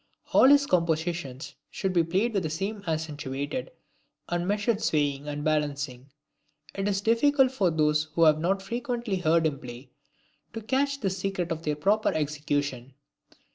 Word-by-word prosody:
All - - +7
his 285 +1 +6
compositions 165 - -1 0.2
should 190 -2 -2
be 170 -2 +4
played 190 +8 0
with 195 - +1
this 160 -1 -3
accentuated 160 - -3 0.6
and 175 0 -1
measured 205 +2 0
swaying 145 -2 0
and 145 0 -4
balancing. 145 -4 -2 0.6
It 195 0 -2
is 195 -1 0
difficult 260 +5 +3
for 200 -9 +1
those 155 -1 +2
who 165 - +4
have 155 -1 +5
not 195 +4 0
frequently 235 -1 -3
heard 165 -1 +2
him 145 -3 -1
play 125 +1 -10 0.6
to 225 - -5
catch 275 +4 0
this 190 -3 -1
secret 185 -3 -2
of 160 -1 -3
their 150 -2 -1
proper 205 +8 +2
execution. 145 -4 -2
170 Hz, 150 wpm, -27 LUFS, 150-205 Hz, 0.6 s, All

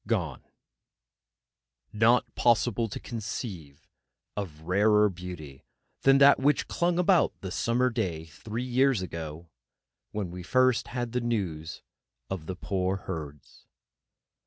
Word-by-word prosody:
GONE 90 - -1 1.5
Not 115 +3 +3
possible 120 -1 +2
to - - -5
conceive 105 - -6 0.5
of 85 -7 -5
rarer 105 +5 +4
beauty 85 -7 -9 0.4
than 135 0 +6
that 140 +1 +7
which 140 +1 +2
clung 175 0 0
about 180 -1 +3
the 95 - -5
summer 125 +5 +1
day 90 -9 -2
three 110 +9 -6
years 130 -4 +2
ago 80 -1 -7 0.6
when 100 -5 -4
first 130 +6 +2
we - - -11
had 120 -2 -2
the 125 +1 -1
news 90 -9 -3 0.5
of 85 -5 -4
the 95 - -4
poor 95 0 -1
Herds. 75 -7 -8
105 Hz, 120 wpm, -28 LUFS, 85-120 Hz, 1.5 s, that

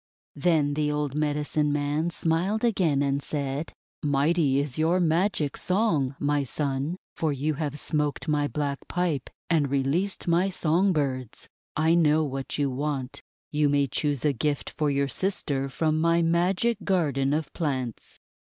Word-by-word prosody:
Then 150 -2 +2
the 150 0 0
old 150 -2 -1
Medicine 150 0 0
Man 145 +3 0
smiled 175 +7 0
again, 170 - +2
and 140 0 0
said: 140 +1 -3 0.2
— - - -
"Mighty 145 0 +2
is 140 0 -2
your 165 +3 +3
magic 165 -3 +1
song, 170 - +1
my 145 0 +1
Son, 140 +4 -2 0.2
for 160 -2 0
you 145 +3 -1
have 150 0 -3
smoked 150 0 -1
my 150 -1 +1
black 145 -2 -2
pipe 170 -7 -1 0.2
and 155 -4 +2
released 140 +10 -1
my 175 +3 +3
song 180 +2 +2
birds. 130 - -2 0.3
I 160 +2 +3
know 160 -2 +4
what 135 -2 -3
you 140 -2 +1
want. 135 -1 -3 0.3
You 150 -1 +2
may 140 0 +3
choose 145 +1 -1
a 145 - +3
gift 145 +3 -2
for 150 -1 +1
your 140 0 +1
sister 140 -4 +1
from 155 +3 0
my 170 +1 +3
Magic 180 +7 +1
Garden 145 -8 +1
of 150 0 -2
Plants." 130 -8 -3
150 Hz, 155 wpm, -26 LUFS, 140-165 Hz, 0.3 s, know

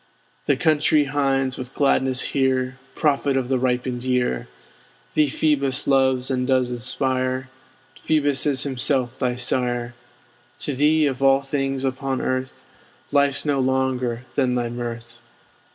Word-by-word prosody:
Thee 140 - +4
country 155 +1 +3
hinds 135 -2 0
with 130 +1 -7
gladness 130 -2 +2
hear, 130 -1 0 0.2
Prophet 140 -2 +1
of 130 -1 -2
the 130 -1 +1
ripened 125 -1 -1
year! 125 - 0 0.7
Thee 155 -1 +3
Phoebus 140 -2 0
loves, 130 -1 +2
and 125 -1 -1
does 130 -2 +2
inspire; 130 +1 0 0.5
Phoebus 145 -3 +1
is 135 -2 +1
himself 130 -1 0
thy 125 -2 0
sire. 120 -1 -2 0.7
To 145 - -3
thee, 150 +3 +3
of 135 -2 -2
all 135 0 +4
things 135 -1 -2
upon 130 0 -2
Earth, 130 0 -3 0.5
Life's 140 0 +2
no 145 -2 +1
longer 130 -2 0
than 130 -3 +1
thy 120 -1 -1
mirth. 120 0 -7
130 Hz, 135 wpm, -22 LUFS, 125-140 Hz, 0.7 s, Thee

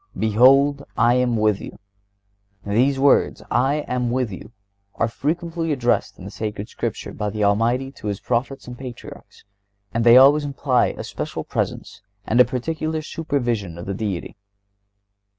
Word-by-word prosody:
"Behold, 135 +6 +4
I 120 +1 +4
am 125 -2 +1
with 105 -2 +1
you." - - -9 0.9
These 125 +7 +2
words, 140 +1 +3
"I 135 +5 +1
am 125 -1 -1
with 125 -2 -1
you," 100 +4 -9 0.4
are 115 - +1
frequently 165 +6 -2
addressed 125 -4 0
in 95 - -9
Sacred 105 -1 -5
Scripture - - -5
by 105 - -3
the 105 +1 -2
Almighty 115 +6 +1
to 110 - -9
His 100 -2 -2
Prophets 130 +3 -2
and 125 - -8
Patriarchs, 125 -1 -11 0.5
and 115 - 0
they 120 +1 +8
always 140 +3 +6
imply 140 -2 +1
a - - -6
special - - -5
presence - - -4 0.2
and 120 - +1
a 125 - +8
particular 155 +5 -3
supervision 120 - -2
of 85 - -7
the 100 - -3
Deity. 100 -3 -4
125 Hz, 150 wpm, -22 LUFS, 110-140 Hz, 0.9 s, they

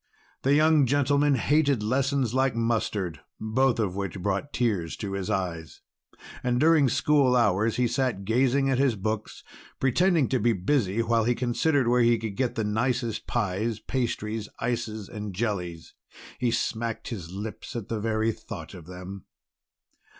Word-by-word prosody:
The 140 +2 +3
young 155 -2 +4
gentleman 145 +1 +3
hated 140 -2 +2
lessons 130 +1 0
like 130 -2 +2
mustard, 110 -6 -1 0.2
both 120 +4 +1
of 100 -5 -1
which 95 -2 -3
brought 100 +9 -2
tears 100 -9 -1
to 100 - -4
his 100 -2 -3
eyes. 85 -4 -3 0.6
And 125 -1 0
during 155 -2 +5
school 140 0 +3
hours 110 -1 +2
he 125 0 +2
sat 120 -6 -1
gazing 130 +5 +2
at 130 -1 +1
his 135 -4 +3
books, 110 +2 -4 0.4
pretending 160 +2 +3
to 130 - +1
be 115 +2 +3
busy, 110 +1 +1
while 115 -1 +2
he 120 +1 +2
considered 130 +2 +1
where 125 +1 +4
he 120 0 +4
could 110 -3 -5
get 130 0 -1
the 110 - -1
nicest 115 +2 -1
pies, 110 0 -1
pastries, 110 -4 -3
ices, 115 -3 -3
and 105 -4 -6
jellies. 90 -6 -3 0.5
He 125 -1 +1
smacked 115 -1 -2
his 90 -9 -6
lips 105 +6 -7
at 115 -4 -4
the 115 - -3
very 110 +1 0
thought - - -9
of 85 -3 -11
them. 90 +1 -9
115 Hz, 155 wpm, -26 LUFS, 105-130 Hz, 0.6 s, during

